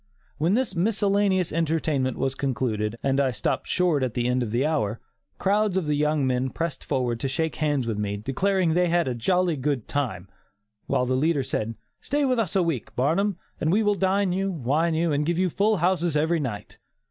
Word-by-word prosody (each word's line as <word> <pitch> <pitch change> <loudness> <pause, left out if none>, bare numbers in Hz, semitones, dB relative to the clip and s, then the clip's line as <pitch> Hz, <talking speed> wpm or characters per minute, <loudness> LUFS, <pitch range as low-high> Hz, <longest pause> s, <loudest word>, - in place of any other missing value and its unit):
When 170 +7 +2
this 245 -6 0
miscellaneous 200 -1 +1
entertainment 155 -5 0
was 135 - 0
concluded, 115 -5 -2
and 135 0 +1
I 135 -2 +3
stopped 120 - -2
short 175 -6 +1
at 130 -3 -2
the 120 -1 0
end 125 +1 +1
of 120 - -2
the 120 +6 +1
hour, 115 -8 0 0.4
crowds 205 0 +1
of 185 - 0
the 150 - 0
young 150 -1 +1
men 130 0 0
pressed 165 -1 -4
forward 125 -4 -1
to 135 - -1
shake 160 +4 -2
hands 145 -4 0
with 110 -3 -2
me, 100 -1 -2
declaring 175 - 0
that - - +2
they 180 +1 +3
had 170 0 +2
had - - -1
a - - -1
"jolly 175 +8 +1
good 135 -3 -2
time," 130 -10 -2 0.6
while 125 - +1
the 130 - 0
leader 145 +2 +1
said: 115 -3 -3 0.3
"Stay 290 +1 0
with 255 -3 +1
us 205 -6 -1
a 190 - +4
week, 160 -8 -3
Barnum, 175 +9 +1 0.2
and 155 - +1
we 215 +4 +3
will 205 0 +3
dine 195 0 +1
you, 195 +1 -1
wine 160 +2 0
you, 165 0 +1
and 145 0 +1
give 170 +2 0
you 185 -1 +1
full 210 +4 +2
houses 175 -3 +1
every 160 +3 +1
night." 120 -8 -5
155 Hz, 215 wpm, -25 LUFS, 130-185 Hz, 0.6 s, a